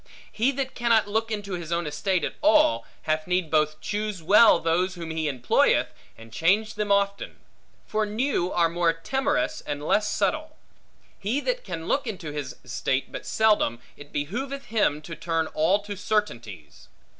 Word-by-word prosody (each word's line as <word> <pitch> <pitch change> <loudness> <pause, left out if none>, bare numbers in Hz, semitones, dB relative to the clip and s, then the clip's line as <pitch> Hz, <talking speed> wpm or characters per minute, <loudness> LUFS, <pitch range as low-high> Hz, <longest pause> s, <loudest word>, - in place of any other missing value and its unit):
He 230 +5 +1
that 265 0 -3
cannot 230 -3 +2
look 220 +2 -1
into 205 -3 -4
his 170 -2 -5
own 170 0 0
estate 170 +5 -1
at - - -2
all, 300 - +4 0.2
had 155 +1 -1
need 180 -3 0
both 155 -1 +2
choose 210 -3 -3
well 210 +4 +7
those 175 +3 0
whom 165 -2 -6
he 160 -1 -1
employeth, 130 -4 +2 0.2
and 115 0 -14
change 200 - +2
them 210 -1 -2
often; 200 0 +1 0.5
for 215 0 -1
new 210 -3 -1
are 170 -1 +3
more 170 0 +1
timorous 270 - -1
and 145 0 -5
less 210 +5 +2
subtle. 310 0 -1 0.6
He 220 +8 -1
that - - -2
can 165 - -6
look 275 -2 0
into 180 -8 -5
his 140 -4 -5
estate 130 +2 -2
but - - -7
seldom, 210 - +2 0.2
it 145 0 -13
behooveth 260 - -3
him 205 -9 0
to 165 - -7
turn 165 -1 -1
all 165 +6 +3
to 205 0 -6
certainties. 120 - -3
185 Hz, 165 wpm, -25 LUFS, 155-220 Hz, 0.6 s, well